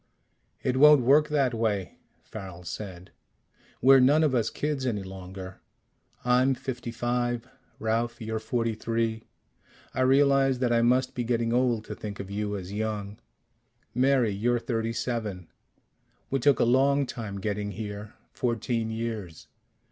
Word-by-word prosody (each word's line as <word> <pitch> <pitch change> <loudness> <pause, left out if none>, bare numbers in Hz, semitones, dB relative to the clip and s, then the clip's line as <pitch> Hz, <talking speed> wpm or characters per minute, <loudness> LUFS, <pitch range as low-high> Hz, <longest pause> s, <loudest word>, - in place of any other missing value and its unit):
"It 130 0 0
won't 150 0 +8
work 145 +5 +5
that 140 -4 +2
way," 105 -5 -2 0.2
Farrel 95 -4 -9
said. 90 +1 -7 0.7
"We're 135 +1 +8
none 145 +5 +5
of 150 -4 +2
us 115 -3 +1
kids 150 -2 -2
any 105 -5 -1
longer. 95 0 -9 0.6
I'm 125 +2 +3
fifty 125 -2 -5
five. 120 0 -1 0.3
Ralph, 115 +2 -1
you're 110 -1 -3
forty 115 +1 -1
three. 115 0 -2 0.7
I - - -1
realize 135 0 +4
that 125 -1 +1
I 115 - +3
must 125 +2 +2
be 125 - -2
getting 115 -1 0
old 120 -3 +1
to - - -6
think 105 -1 -7
of 100 0 -6
you 105 0 -2
as 95 0 -7
young. 105 -1 -3 0.7
Mary, 125 -2 +3
you're 120 +5 +1
thirty 115 -1 -2
seven. 110 -7 -3 0.8
We 135 - +1
took 140 +2 +3
a - - +4
long 135 +3 +3
time 110 -6 -6
getting 105 +1 -2
here. 105 0 -7 0.2
Fourteen 115 -1 -1
years. 110 -7 -5
115 Hz, 145 wpm, -27 LUFS, 105-130 Hz, 0.8 s, won't